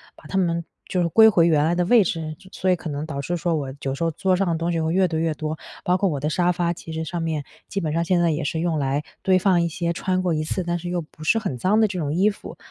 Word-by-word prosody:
把 - - -19
它 195 - -2
们 170 -2 +1 0.2
就 180 - 0
是 170 - +2
归 220 +6 +7
回 170 -5 +4
原 150 -3 +3
来 165 +3 +2
的 175 0 +1
位 235 +1 +6
置， 160 -3 -3 0.2
所 190 - -1
以 180 - +5
可 165 -1 -7
能 145 +1 -3
导 140 -3 -4
致 175 +6 -2
说 170 0 0
我 135 -3 -3
有 135 0 -2
时 140 - -3
候 165 - +1
桌 185 +4 +1
上 195 - +1
的 170 - +1
东 170 +1 -1
西 165 - 0
会 160 +1 0
越 185 0 +3
堆 160 -2 -2
越 165 -1 +1
多。 155 +1 -4 0.3
包 180 +1 +3
括 195 0 +1
我 145 - -2
的 150 +3 -1
沙 175 +2 +2
发， 175 -1 0
其 165 - -10
实 160 0 -3
上 170 +2 -4
面 155 -3 -2 0.3
基 200 - -2
本 155 -5 -2
上 165 +1 +1
现 175 +1 +2
在 170 - +3
也 155 0 -2
是 160 +3 -2
用 165 -1 0
来 140 0 0 0.2
堆 185 -1 +4
放 185 -2 +3
一 170 - +1
些 170 0 -2
穿 185 +1 -1
过 180 -2 0
一 155 0 0
次， 180 +4 -2
但 175 0 -1
是 175 +1 -6
又 175 0 -1
不 155 0 -13
是 225 +8 +3
很 190 - -3
脏 195 - +2
的 220 - +5
这 190 -2 -5
种 145 -2 -1
衣 190 +5 +3
服。 210 - -9
170 Hz, 340 characters per minute, -23 LUFS, 155-180 Hz, 0.3 s, 归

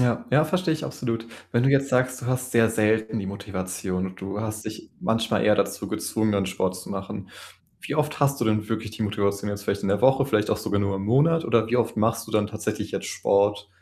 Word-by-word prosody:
Ja, 120 -2 +1
ja, 150 +4 +5
verstehe 180 0 +1
ich 155 0 -3
absolut. 115 -2 -3 0.2
Wenn 120 +1 +2
du 135 - +5
jetzt 140 0 +3
sagst, 130 0 +1
du - - -5
hast 130 0 -1
sehr 115 -2 +4
selten 110 +1 +1
die 100 - -4
Motivation 95 -2 -3
und 95 0 -10
du 100 +2 -4
hast 110 0 -4
dich 110 0 -8
manchmal 115 -2 +1
eher 105 - +6
dazu - - -1
gezwungen, 110 -1 -1
dann 100 -1 +1
Sport 95 0 -1
zu 90 - -9
machen, 95 0 -6 0.5
wie - - -4
oft 150 0 0
hast 140 -1 +2
du 120 - +1
denn 110 -1 +1
wirklich 110 -1 -3
die 110 0 -4
Motivation 100 0 -1
jetzt 100 0 -5
vielleicht 100 - -1
in - - -1
der 100 +1 +1
Woche? 135 +2 +5
Vielleicht 105 -6 +1
auch - - +2
sogar 100 -2 -1
nur 100 -1 0
im 95 - -4
Monat? 155 +9 +3
Oder 115 -2 +3
wie 120 - +2
oft 115 -2 0
machst 115 +1 +1
du - - -10
dann 105 -1 +2
tatsächlich 105 0 -4
jetzt - - -3
Sport? 100 +1 +1
110 Hz, 240 wpm, -25 LUFS, 100-125 Hz, 0.5 s, eher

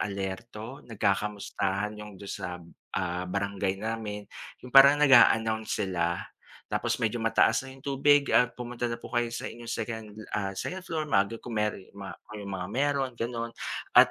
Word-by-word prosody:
alerto, 105 +6 -5
nagkakamustahan 100 -1 -1
'yong 105 -2 -9
do'n 100 +1 -8
sa, - - -3 0.5
ah, 90 -1 -1
barangay 100 0 -1
namin. 105 -1 -4 0.4
Yung 125 - -10
parang 140 +1 +9
nag-a-announce 115 -6 +5
sila, 85 -2 -1 0.4
tapos - - -1
medyo 115 +1 0
mataas 115 +3 +3
na 130 - -9
'yong 135 - -12
tubig 140 +1 +4
at 125 0 +5
pumunta 120 0 -3
na 115 - -3
po - - -10
kayo 120 -1 +1
sa 115 - -4
inyong 120 0 -7
second, 110 -1 -4 0.3
ah, 100 -2 -1
second 185 - -4
floor 160 -3 -2
maaga 105 -4 +2
kung 120 - -7
mero 105 -1 0 0.2
ma 100 -1 -7 0.2
kayong 100 -2 -6
mga 90 0 -4
meron 140 -1 +1
gano'n, 115 0 -3 0.4
at, - - +8
110 Hz, 160 wpm, -28 LUFS, 100-125 Hz, 0.5 s, parang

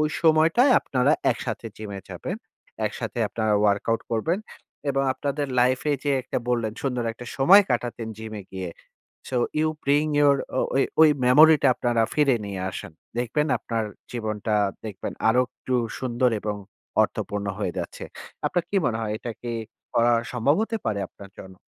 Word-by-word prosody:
ওই 150 - +2
সময়টায় 165 - +5
আপনারা 135 +3 +2 0.2
একসাথে 115 -1 -4
জিমে 100 -2 -6
যাবেন। - - -5 0.5
একসাথে - - -5
আপনারা 110 -2 0
ওয়ার্কআউট 105 +2 +2
করবেন। 155 - 0 0.5
এবং 135 0 +1
আপনাদের 140 +1 -2
লাইফ 125 +1 +3
এ - - +3
যে 145 - +1
একটা - - -2
বললেন 115 -3 0
সুন্দর 125 -3 -1
একটা 120 +1 -11
সময় 185 +10 +8
কাটাতেন 120 -2 -2
জিমে 110 -2 -6
গিয়ে। 95 -2 -4 0.6
সো 130 - -2 0.2
ইউ 155 0 +2 0.2
ব্রিং 145 +2 +3 0.2
ইউর 140 -1 +5 0.2
অ - - +3
ও-ই 135 - +4 0.2
ওই 160 - +9 0.2
মেমোরি 155 +5 +8
টা 135 - +6
আপনারা 120 -2 +1
ফিরিয়ে 140 -6 +3
নিয়ে 95 -2 -5
আসেন। 85 - -7 0.3
দেখবেন 125 +6 0
আপনার 115 -2 -2 0.3
জীবনটা 110 -2 -2 0.3
দেখবেন 100 -3 -5 0.2
আরো 125 +3 +4
একটু 130 - -5 0.3
সুন্দর 125 -1 +1
এবং 105 -1 -2 0.5
অর্থপূর্ণ 100 0 -2
হয়ে 90 -4 -1
যাচ্ছে। - - -5 0.4
আপনার 175 -2 0
কি 200 - 0
মনে 115 -2 0
হয় 105 -2 -2
এটা 120 - -5
কি 120 -1 -3 0.4
করা 120 +1 +4 0.2
সম্ভব 125 +5 +2
হতে 225 0 -2
পারে 105 -2 0
আপনার 100 -1 -13
জন্য? 95 0 -10
120 Hz, 165 wpm, -25 LUFS, 110-145 Hz, 0.6 s, ওই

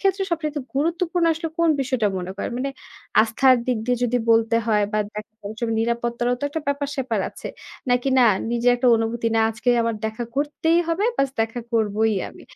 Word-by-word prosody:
ক্ষেত্রে 390 0 +1
সবচাইতে 305 -3 -2
গুরুত্বপূর্ণ 340 +3 0
আসলে 325 +1 -4
কোন 335 -1 +3
বিষয়টা 250 -5 +1
মনে 180 +1 -5
করেন? - - -3
মানে 275 +2 -2 0.5
আস্থার 255 +3 +4
দিক 250 -3 +1
দিয়ে 250 0 +2
যদি 245 +1 +1
বলতে 225 0 +4
হয় 210 -2 +3
বা 215 - +1 0.2
দেখা 215 +1 -7
করার 205 +2 -7
সময় 225 -2 -1
নিরাপত্তারও 235 +1 -1
তো - - -2
একটা 320 +3 -4
ব্যাপার-স্যাপার 275 -6 -1
আছে। - - -8 0.4
নাকি 245 +2 +2
না 250 - +6 0.3
নিজে 240 +1 +1
একটা 250 +1 0
অনুভূতি, 225 +1 -2
না - - +4
আজকে 220 +2 -4
আমার 230 0 0
দেখা 220 +2 -4
করতেই 310 +3 +1
হবে, 335 +5 0
ব্যাস 275 -1 +1
দেখা 225 +2 -1
করবই 220 -1 +1
আমি। - - -14
245 Hz, 185 wpm, -23 LUFS, 225-290 Hz, 0.5 s, না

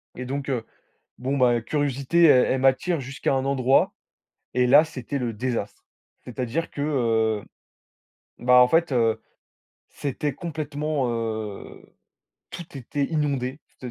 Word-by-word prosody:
Et 125 - -6
donc, 140 +2 -4
heu, 120 -4 -2 0.5
bon 130 +3 -2
bah 120 -2 +3
curiosité 145 +5 +1
e 125 -3 +6
elle 130 - 0
m'attire 135 +5 +2
jusqu'à 135 +1 -2
un 135 0 0
endroit, 135 -1 +2 0.6
et 125 0 +2
là 145 +5 +7
c'était 140 -2 -5
le 120 -3 -2
désastre! 115 -2 -4 0.4
C'est-à-dire 125 +6 -3
que, 145 - -5
heu, 115 -7 +1 1.0
ben 125 +1 +2
en 125 0 +8
fait, 165 +3 +2
heu, 115 -3 +1 0.7
c'était 145 +1 -3
complètement 150 -3 -3
heu, 110 -3 -5 0.7
tout 170 -4 -9
était 140 +2 -2
inondé 140 -3 -2 0.2
t 125 - -6
130 Hz, 135 wpm, -24 LUFS, 120-145 Hz, 1.0 s, en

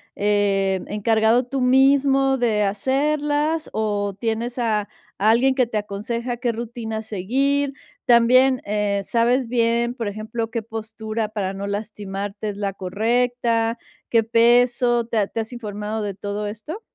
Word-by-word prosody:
em, 200 -2 +1
encargado 220 +3 +2
tú 270 +2 -3
mismo 270 +1 +4
de 220 -4 +1
hacerlas, 295 +8 0
¿o 205 -2 -1
tienes 235 +2 -2
a 215 -3 0 0.3
a 210 +2 +3
alguien 250 +4 +4
que 255 -2 +1
te 225 - -3
aconseja 230 +4 -3
qué 245 -1 0
rutinas 225 -1 -5
seguir? 270 +8 0 0.3
También, 250 +2 +5
eh, 205 -1 0
sabes 240 +3 +2
bien, 235 0 +1
por 235 -4 -4
ejemplo, 220 +2 -4
¿qué 230 -1 -3
postura 220 0 -4
para 200 -3 -3
no 200 +1 -5
lastimarte 205 0 -4
es 200 - -6
la 200 -1 -2
correcta, 230 +4 0 0.3
qué 230 -1 +3
peso, 240 +1 +3
te 230 0 -3
ha 200 - +1
te 225 - -3
has 225 +3 -7
informado 210 -1 -4
de 205 -1 -3
todo 205 +1 -4
esto? 300 - -7
225 Hz, 145 wpm, -22 LUFS, 210-245 Hz, 0.3 s, También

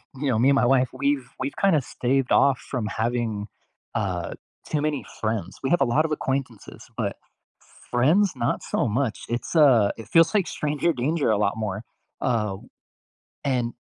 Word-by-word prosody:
you 140 +2 -3
know, 110 - +1
me 130 +4 +4
and 140 - +4
my 130 - +3
wife, 130 0 +3
we've 135 -1 -1
we've 135 +2 -3
kinda 195 -6 +4
staved 130 +1 -1
off 140 -2 +4
from 125 -5 -4
having, 110 -1 -2 0.5
uh, 90 -5 -2 0.3
too 150 - -1
many 150 -2 -1 0.2
friends. 110 -5 -2
We 135 - 0
have 175 - +3
a - - +5
lot 130 +6 +2
of 155 - -3
acquaintances, 130 -6 -4
but - - -1 0.8
friends? 165 +11 +3
Not 120 - -1
so - - 0
much. 115 +1 -1
It's, 120 +7 -3
uh, 130 -10 +6
it 115 - -9
feels 165 +7 +5
like 195 -4 +3
stranger 150 +3 0
danger 145 +3 0
a 105 - +2
lot 105 0 0
more, 105 0 -3 0.4
uh, 105 -6 0 0.9
and 125 -4 0
125 Hz, 175 wpm, -24 LUFS, 110-145 Hz, 0.9 s, uh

